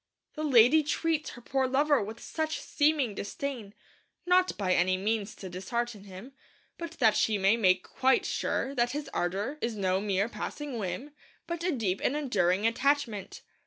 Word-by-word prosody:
The 305 Hz, -, -6 dB
lady 265 Hz, +1 st, +6 dB
treats 310 Hz, +1 st, -1 dB
her 240 Hz, -, -11 dB
poor 265 Hz, 0 st, 0 dB
lover 285 Hz, +2 st, +3 dB
with 220 Hz, +3 st, -6 dB
such 315 Hz, +3 st, -3 dB
seeming 290 Hz, -6 st, +1 dB
disdain, 215 Hz, +1 st, -5 dB, 0.5 s
not 365 Hz, +1 st, +3 dB
by 185 Hz, -3 st, +1 dB
any 185 Hz, +1 st, +2 dB
means 210 Hz, +1 st, -2 dB
to 190 Hz, -, -8 dB
dishearten 205 Hz, +4 st, -4 dB
him, 195 Hz, +7 st, -11 dB, 0.5 s
but 335 Hz, -1 st, -6 dB
that 220 Hz, -, +3 dB
she 215 Hz, -2 st, +2 dB
may 195 Hz, +3 st, +4 dB
make 185 Hz, -5 st, +3 dB
quite 265 Hz, 0 st, +1 dB
sure 270 Hz, -, -1 dB
that 245 Hz, -1 st, +1 dB
his 295 Hz, 0 st, -5 dB
ardour 200 Hz, +12 st, -2 dB
is 230 Hz, -1 st, -2 dB
no 190 Hz, -1 st, 0 dB
mere 200 Hz, 0 st, 0 dB
passing 275 Hz, +1 st, -5 dB
whim, 195 Hz, +9 st, -4 dB, 0.3 s
but 340 Hz, -1 st, -4 dB
a 360 Hz, -, +1 dB
deep 205 Hz, -, -1 dB
and 275 Hz, -, +1 dB
enduring 205 Hz, -9 st, +1 dB
attachment. 230 Hz, -4 st, 0 dB
235 Hz, 165 wpm, -29 LUFS, 200-290 Hz, 0.5 s, lady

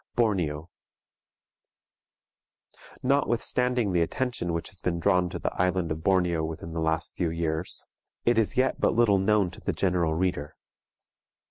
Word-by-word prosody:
BORNEO. 85 Hz, -10 st, 0 dB, 2.4 s
Notwithstanding 125 Hz, -3 st, +1 dB
the 90 Hz, -2 st, +2 dB
attention 120 Hz, 0 st, -1 dB
which 85 Hz, 0 st, -3 dB
has 95 Hz, -4 st, -7 dB
been 85 Hz, -2 st, -1 dB
drawn 90 Hz, 0 st, +2 dB
to -, -, -5 dB
the -, -, -3 dB
island 90 Hz, -2 st, 0 dB
of 80 Hz, +1 st, -4 dB
Borneo 90 Hz, -4 st, +2 dB
within 80 Hz, +1 st, -5 dB
the 80 Hz, -, -2 dB
last 80 Hz, +2 st, -1 dB
few 85 Hz, -3 st, 0 dB
years, 80 Hz, 0 st, -2 dB, 0.4 s
it 120 Hz, -1 st, +4 dB
is 110 Hz, -, 0 dB
yet 130 Hz, +1 st, +1 dB
but -, -, +2 dB
little 110 Hz, -4 st, +4 dB
known 100 Hz, -2 st, +2 dB
to -, -, -12 dB
the -, -, -1 dB
general 90 Hz, -4 st, +1 dB
reader. 80 Hz, -4 st, -2 dB
90 Hz, 145 wpm, -27 LUFS, 80-105 Hz, 2.4 s, it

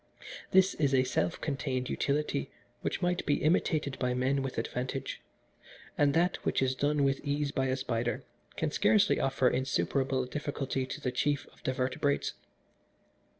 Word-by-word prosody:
This 190 Hz, +1 st, +5 dB
is 140 Hz, -3 st, +2 dB
a 130 Hz, -, +4 dB
self 90 Hz, -9 st, -1 dB
contained 135 Hz, -3 st, -2 dB
utility 140 Hz, -, -1 dB, 0.3 s
which -, -, -2 dB
might 180 Hz, 0 st, +1 dB
be 145 Hz, -, 0 dB
imitated 155 Hz, -3 st, +1 dB
by 125 Hz, -1 st, 0 dB
men 130 Hz, +2 st, +1 dB
with 135 Hz, -1 st, -4 dB
advantage, 130 Hz, +2 st, -3 dB, 0.7 s
and 145 Hz, -1 st, +3 dB
that 175 Hz, +2 st, +3 dB
which -, -, -1 dB
is 130 Hz, -1 st, +2 dB
done 145 Hz, +2 st, +1 dB
with 135 Hz, 0 st, +2 dB
ease 145 Hz, 0 st, -1 dB
by 135 Hz, -1 st, 0 dB
a 130 Hz, 0 st, 0 dB
spider 120 Hz, -2 st, -2 dB, 0.3 s
can -, -, 0 dB
scarcely 105 Hz, 0 st, +4 dB
offer 135 Hz, -1 st, +2 dB
insuperable 130 Hz, +2 st, +1 dB
difficulty 135 Hz, -1 st, -3 dB
to -, -, -5 dB
the 125 Hz, -, -2 dB
chief 145 Hz, +3 st, 0 dB
of -, -, -22 dB
the 130 Hz, -, +1 dB
vertebrates. 130 Hz, +2 st, 0 dB
135 Hz, 155 wpm, -31 LUFS, 130-145 Hz, 0.7 s, This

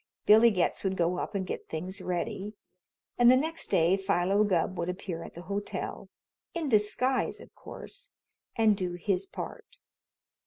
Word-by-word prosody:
Billy 220 Hz, +3 st, +8 dB
Getz 185 Hz, -5 st, 0 dB
would 190 Hz, -1 st, -1 dB
go 175 Hz, +1 st, +1 dB
up -, -, -4 dB
and 190 Hz, -1 st, -1 dB
get -, -, -6 dB
things 185 Hz, +5 st, -5 dB
ready, 185 Hz, +3 st, -3 dB, 0.7 s
and 240 Hz, 0 st, +7 dB
the 255 Hz, -, +7 dB
next 320 Hz, +4 st, -2 dB
day 170 Hz, +3 st, +3 dB
Philo 195 Hz, +1 st, +2 dB
Gubb 185 Hz, -2 st, +1 dB
would 170 Hz, +1 st, -1 dB
appear 180 Hz, -2 st, -4 dB
at -, -, -10 dB
the 175 Hz, -, -8 dB
hotel 200 Hz, +2 st, -4 dB, 0.5 s
in 325 Hz, -4 st, -1 dB
disguise, 250 Hz, +4 st, +1 dB
of -, -, -14 dB
course -, -, -9 dB, 0.5 s
and 220 Hz, -3 st, +4 dB
do 180 Hz, -3 st, -3 dB
his 185 Hz, +1 st, -1 dB
part. -, -, -8 dB
195 Hz, 160 wpm, -29 LUFS, 180-215 Hz, 0.7 s, Billy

